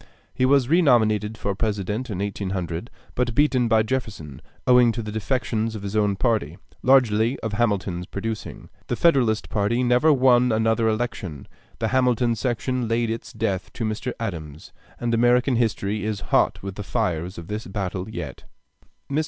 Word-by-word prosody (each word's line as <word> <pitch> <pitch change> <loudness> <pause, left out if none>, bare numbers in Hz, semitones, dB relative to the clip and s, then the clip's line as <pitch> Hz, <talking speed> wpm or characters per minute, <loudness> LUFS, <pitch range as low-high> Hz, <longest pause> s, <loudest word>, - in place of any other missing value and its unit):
He 130 - +2
was 135 -2 +4
renominated 110 - +3
for 100 -2 -2
President 105 +3 -2
in 100 - -3
1800, 95 -1 -3 0.2
but 120 -2 -1
beaten 130 -4 +3
by 110 -1 +4
Jefferson, 110 - -4 0.2
owing 125 -2 +6
to 115 - -4
the 105 - -5
defections 110 0 -1
in 105 - -7
his 100 +1 -4
own 105 -2 +2
party, 110 +2 0 0.2
largely 120 -2 +3
of 110 -2 -3
Hamilton's 100 -5 -1
producing. 110 +2 -6 0.2
The - - -1
Federalist 125 -10 +2
party 110 +4 0
never 125 +6 +4
won 125 -3 +4
another 110 +1 +2
election; 110 - -3 0.3
the 110 - -1
Hamilton 125 -2 +2
section 125 +1 -1
laid 115 0 0
its 115 - -5
death 100 -4 -2
to 115 - -3
Mr. 110 +3 -3
Adams, 80 -9 -6 0.3
and 120 -1 -1
American 120 +2 +3
history 105 -3 -1
is 105 -2 -3
hot - - +2
with 100 -1 -5
the - - -4
fires 85 +2 -2
of 85 - -7
this 105 +5 -5
battle 95 -1 -4
even - - -11
yet. - - -6 0.6
Mr. 140 +2 0
110 Hz, 165 wpm, -23 LUFS, 100-125 Hz, 0.6 s, owing